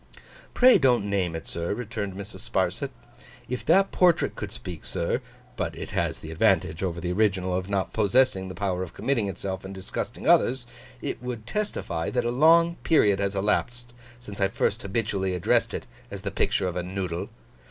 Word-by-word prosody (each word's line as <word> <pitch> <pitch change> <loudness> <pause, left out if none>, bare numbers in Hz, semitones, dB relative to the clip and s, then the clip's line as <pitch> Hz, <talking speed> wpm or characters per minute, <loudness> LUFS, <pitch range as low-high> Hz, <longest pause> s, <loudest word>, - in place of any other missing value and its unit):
'Pray 250 -4 +7
don't 125 -7 +3
name 95 -4 0
it, 80 - -6
sir,' 85 +3 -3
returned 110 -5 -4
Mrs. 100 0 -8
Sparsit. - - 0 0.6
'If 125 0 -4
that 190 +5 +5
portrait 180 -2 +3
could - - -5
speak, 85 -4 -8
sir—but 125 - -4
it - - -7
has - - -1
the 80 - -8
advantage 85 -2 +2
over 90 -3 -2
the 90 0 -2
original 95 -2 +1
of 95 +1 -3
not 100 -2 -1
possessing 105 -2 +3
the 95 - -7
power 95 -3 -1
of 95 - -6
committing 115 -4 0
itself 95 -1 -4
and 95 0 -7
disgusting 95 - -5
others,—it 120 -1 0
would 125 -3 -5
testify, 120 - -2
that 125 -2 0
a 120 - +1
long 165 +6 +5
period 105 -11 +3
has 100 0 -1
elapsed 120 +4 -1 0.3
since 105 -5 -9
I 100 - +4
first 95 - -1
habitually 100 -2 -1
addressed 90 - +2
it - - -5 0.2
as - - -7
the - - -2
picture - - +1
of 90 - -3
a 90 - 0
Noodle. 90 -1 -4
100 Hz, 175 wpm, -26 LUFS, 95-125 Hz, 0.6 s, Pray